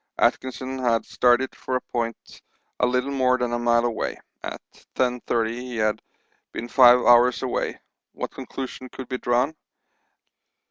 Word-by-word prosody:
Atkinson 130 0 0
had 115 -3 +1
started 125 +1 +2
for 130 - -4
a 125 - 0
point 115 -2 -4 0.4
a 125 - +3
little 125 +2 0
more 130 -2 +2
than 125 -1 -2
a 120 - 0
mile 120 0 +3
away; 115 -2 -2 0.2
at - - -6 0.4
10.30 120 -3 0
he 125 +1 -6
had 110 -1 0 0.5
been 120 - -5
five 125 -1 +7
hours 120 0 +5
away; - - -2 0.3
what - - -5
conclusion 130 -1 -7
could 130 0 -8
be 130 0 -4
drawn? 125 +6 +1
125 Hz, 145 wpm, -24 LUFS, 120-130 Hz, 0.5 s, five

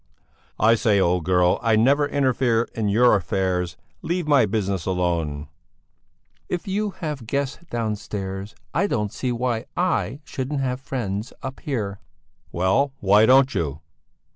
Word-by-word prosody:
"I 110 +3 +5
say, 110 -3 +2
old 90 -2 +1
girl, 90 -1 +3
I 115 -2 +3
never 140 +6 +3
interfere 130 -5 +2
in 110 -2 -1
your 120 +3 +5
affairs; 90 -2 -1 0.2
leave 175 -1 -2
my 140 -7 +5
business 95 -4 -2
alone." 85 -5 -1 1.0
"If 180 +1 -3
you 205 +2 0 0.2
have 140 -7 -4
guests 140 +1 -2
downstairs, 105 -3 -4 0.2
I 200 +4 +2
don't 105 - -1
see 125 - -2
why 120 -1 -1
I 175 -6 0
shouldn't 135 +1 -3
have 125 -1 -2
friends 115 -6 -4
up 130 0 -6
here!" 105 -8 -3 0.5
"Well, 95 +11 +1
why 105 +3 +5
don't 135 +1 +5
you?" 75 -5 -2
115 Hz, 140 wpm, -23 LUFS, 95-135 Hz, 1.0 s, I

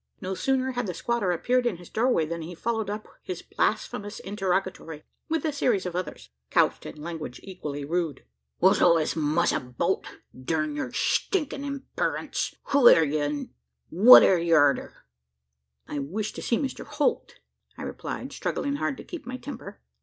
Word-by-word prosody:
No 185 +1 -4
sooner 260 +5 0
had 245 -3 -2
the 180 - -4
squatter 235 -2 0
appeared 245 +8 +1
in 205 -7 -1
his 175 0 -13
doorway, 230 -8 +2
than 170 +1 -4
he 170 +2 -7
followed 220 +2 -2
up 210 +1 -5
his 180 -2 -6
blasphemous 205 0 -2
interrogatory 190 -5 -2 0.3
with 320 -1 0
a 310 - 0
series 230 -9 +1
of 180 -1 -4
others, 180 0 -5 0.2
couched - - +2
in 150 - -9
language 160 -6 -6
equally 150 -7 -6
rude. 165 -2 -2 0.3
"What's - - +4
all 170 - +6
this 155 -2 0
muss 155 +2 +2
about? 130 +9 -1 0.3
Durn 155 +3 -2
yur 145 -4 -3
stinkin' 300 -7 0
imperence, 280 -1 -3
who 280 -4 +7
air 165 - +7
ye? 150 +1 -1
an' 145 0 -3 0.4
what 215 +9 +10
air 185 - +5
ye 170 0 +1
arter?" 145 -3 +2 0.8
"I 145 - -4
wish 195 +10 -3
to - - -7
see 235 - +1
Mr 275 -3 -3
Holt," - - -1 0.4
I - - -7
replied, - - -6
struggling 285 0 -2
hard 275 - -2
to - - -9
keep 345 -8 -9
my 255 0 -4
temper. 60 - -9
185 Hz, 170 wpm, -26 LUFS, 160-245 Hz, 0.8 s, what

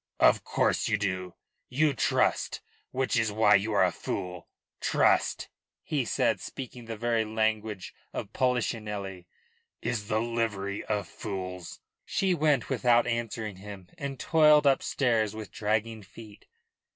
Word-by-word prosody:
"Of - - +5
course - - +1
you 105 - +2
do. 95 -3 -3 0.3
You 150 +3 +2
trust, 125 - +1 0.3
which 130 0 -1
is 110 -1 +1
why 105 0 +4
you 105 +2 +3
are 100 - +4
a 90 - +3
fool. 90 0 -5 0.3
Trust," - - +2 0.4
he - - -1
said, - - +1
speaking 125 -2 -8
the 115 -1 -6
very 115 0 +1
language 110 -2 -1 0.2
of 100 - -6
Polichinelle, 105 -7 -1 0.5
"is 110 -3 -3
the 110 - +1
livery 110 -4 -2
of 105 -2 -1
fools." 90 -4 -6 0.2
She 190 -2 +1
went 150 -6 +2
without 120 -1 +3
answering 115 -3 -3
him 100 -2 -10
and 140 -5 -5
toiled 150 -2 +5
upstairs 120 -5 +2
with 110 -2 -7
dragging 110 +1 -1
feet. 105 +2 -14
110 Hz, 135 wpm, -28 LUFS, 100-120 Hz, 0.5 s, Of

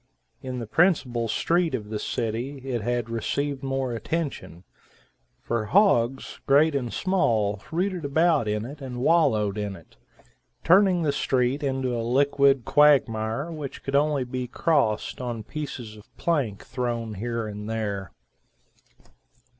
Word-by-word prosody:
In 130 -1 -5
the 120 - -4
principal 125 - +2
street 165 +6 +1
of 105 -3 -6
the 105 - -2
city, 120 +6 -3
it 125 -4 -2
had 120 +1 -1
received 135 +5 -2
more 135 -2 -2
attention; 135 - -4 0.8
for 115 -2 -2
hogs, 135 - +2
great 145 +3 +5
and 125 -4 -2
small, 110 - +1
rooted 180 +1 -1
about 155 -3 +2
in 105 +1 -1
it 145 +4 -9
and 125 -2 -6
wallowed 110 - +3
in 100 -2 -3
it, 85 - -17 0.7
turning 185 -1 +5
the 150 - +2
street 130 0 0
into 130 -3 -1
a 115 - -1
liquid 135 +1 +3
quagmire 135 -1 +3
which 150 -4 -7
could 135 - -2
only 145 -1 +2
be 125 0 -4
crossed 130 -6 0
on 120 -3 -4
pieces 125 -6 -6
of 105 0 -18
plank 135 - -1
thrown 120 -3 -3
here 115 +2 -3
and 105 0 -6
there. 100 -4 -3
125 Hz, 140 wpm, -25 LUFS, 110-145 Hz, 0.8 s, great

